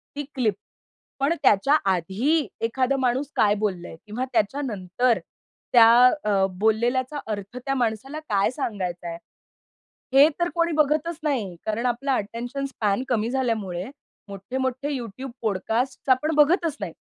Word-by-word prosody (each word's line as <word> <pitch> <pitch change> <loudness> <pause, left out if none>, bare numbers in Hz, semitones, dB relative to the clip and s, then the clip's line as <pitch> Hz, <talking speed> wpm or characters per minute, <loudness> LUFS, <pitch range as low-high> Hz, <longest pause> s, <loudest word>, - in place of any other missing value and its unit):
ती 290 - -3
क्लिप. 235 -6 +1 0.7
पण 280 +4 +2
त्याच्या 210 +8 +4 0.2
आधी 215 - 0
एखादा 255 +4 0
माणूस 260 +2 0
काय 205 -1 +4
बोललंय 185 -6 -3
किंवा 220 +4 -3
त्याच्यानंतर 230 -1 0 0.5
त्या 230 -2 +8 0.3
अ, 200 -2 +2
बोललेल्याचा 245 +6 +1
अर्थ 205 +2 -5
त्या 270 +2 -2
माणसाला 245 +4 -2
काय 200 -1 +2
सांगायचाय, 180 - -4 1.0
हे 280 +3 +8
तर 345 - +2
कोणी 335 -1 +1
बघतच 305 +2 +1
नाही, 245 - -1
कारण 220 +3 -1
आपला 255 +3 0
अटेन्शन 245 +5 -4
स्पॅन 215 -4 -1
कमी 230 -2 0
झाल्यामुळे, 220 -9 -1 0.4
मोठे 200 +6 -7
मोठे 260 +1 -2
YouTube 250 +3 -7
पॉडकास्ट 225 +6 -1
आपण 300 +5 +3
बघतच 315 +1 +3
नाही. - - -4
245 Hz, 130 wpm, -24 LUFS, 210-275 Hz, 1.0 s, त्या